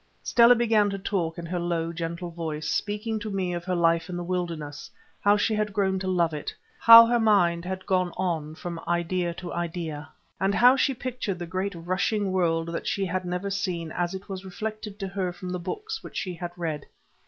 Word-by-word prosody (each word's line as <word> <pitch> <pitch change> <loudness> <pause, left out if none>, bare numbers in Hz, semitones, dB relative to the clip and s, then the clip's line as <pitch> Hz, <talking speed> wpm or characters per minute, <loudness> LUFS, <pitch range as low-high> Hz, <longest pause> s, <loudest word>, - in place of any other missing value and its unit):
Stella 240 +1 +6
began 220 -3 +3
to 195 - -3
talk 180 -4 -2
in 170 - -6
her 175 +1 -2
low, 170 -1 -1
gentle 170 +1 -4
voice, 155 -2 -4
speaking 215 +4 -1
to 215 0 -5
me 190 -3 -1
of 175 0 -4
her 185 -1 0
life 165 0 +2
in 175 - -4
the 175 - -3
wilderness, 170 -5 -4 0.3
how 205 +1 +4
she 220 - +1
had 210 -1 -1
grown 190 -1 +1
to 190 - -4
love 170 -3 +2
it, 150 - -4 0.3
how 230 0 +11
her 240 +1 +2
mind 180 -6 +3
had 190 +1 -4
gone 185 -2 +1
on 160 -4 -2
from 170 0 -6
idea 175 +1 0
to 175 0 -7
idea, 165 -3 -4 0.3
and 195 +2 +1
how 250 +2 +7
she 270 0 +1
pictured 245 -6 -3
the 175 - -5
great 185 +3 -3
rushing 185 +4 -1
world 165 -3 +1
that 170 - -4
she 195 - 0
had 185 +1 -2
never 180 +3 -3
seen 180 -5 -2
as 175 +2 -2
it 190 - -8
was 190 -1 -6
reflected 215 +2 -6
to 195 -2 -4
her 190 -1 -2
from 180 +1 -7
the 180 - -2
books 435 - -5
which - - -8
she 185 - -2
had 175 0 -6
read. 160 -4 -3
180 Hz, 210 wpm, -26 LUFS, 170-200 Hz, 0.3 s, how